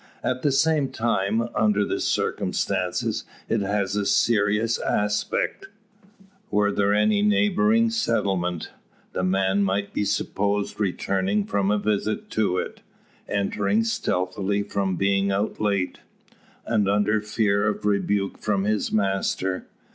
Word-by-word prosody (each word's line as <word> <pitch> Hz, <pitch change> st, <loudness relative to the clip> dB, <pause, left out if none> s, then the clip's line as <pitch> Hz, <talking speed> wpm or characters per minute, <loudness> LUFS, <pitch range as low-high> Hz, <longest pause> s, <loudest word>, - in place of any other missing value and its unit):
At 125 Hz, 0 st, -1 dB
the 145 Hz, -, +2 dB
same 150 Hz, 0 st, +2 dB
time, 110 Hz, -3 st, 0 dB
under 105 Hz, -1 st, +2 dB
the -, -, -2 dB
circumstances, -, -, -1 dB, 0.2 s
it 115 Hz, -, 0 dB
has 100 Hz, 0 st, -1 dB
a 105 Hz, -, 0 dB
serious 110 Hz, 0 st, +2 dB
aspect. 390 Hz, -, -1 dB, 0.8 s
Were 105 Hz, 0 st, +2 dB
there 100 Hz, 0 st, +1 dB
any 205 Hz, -, +3 dB
neighbouring 210 Hz, +2 st, +3 dB
settlement, 95 Hz, -, -1 dB, 0.4 s
the 90 Hz, -, -1 dB
man 95 Hz, +1 st, +2 dB
might 100 Hz, +1 st, -1 dB
be -, -, 0 dB
supposed 100 Hz, 0 st, -1 dB
returning 100 Hz, 0 st, 0 dB
from 100 Hz, -1 st, 0 dB
a 105 Hz, -, +3 dB
visit 105 Hz, +1 st, -1 dB
to 105 Hz, -4 st, +1 dB
it; -, -, -4 dB, 0.5 s
entering 100 Hz, +1 st, +1 dB
stealthily, 100 Hz, -2 st, -1 dB
from 100 Hz, -2 st, -1 dB
being 100 Hz, +1 st, +1 dB
out 100 Hz, +2 st, -1 dB
late, 100 Hz, -3 st, 0 dB, 0.7 s
and 105 Hz, -4 st, +1 dB
under 105 Hz, +1 st, +2 dB
fear 105 Hz, -1 st, +1 dB
of 105 Hz, -, -2 dB
rebuke 100 Hz, -1 st, 0 dB
from 100 Hz, -2 st, 0 dB
his 105 Hz, 0 st, 0 dB
master. 95 Hz, -2 st, -1 dB
105 Hz, 125 wpm, -24 LUFS, 100-110 Hz, 0.8 s, any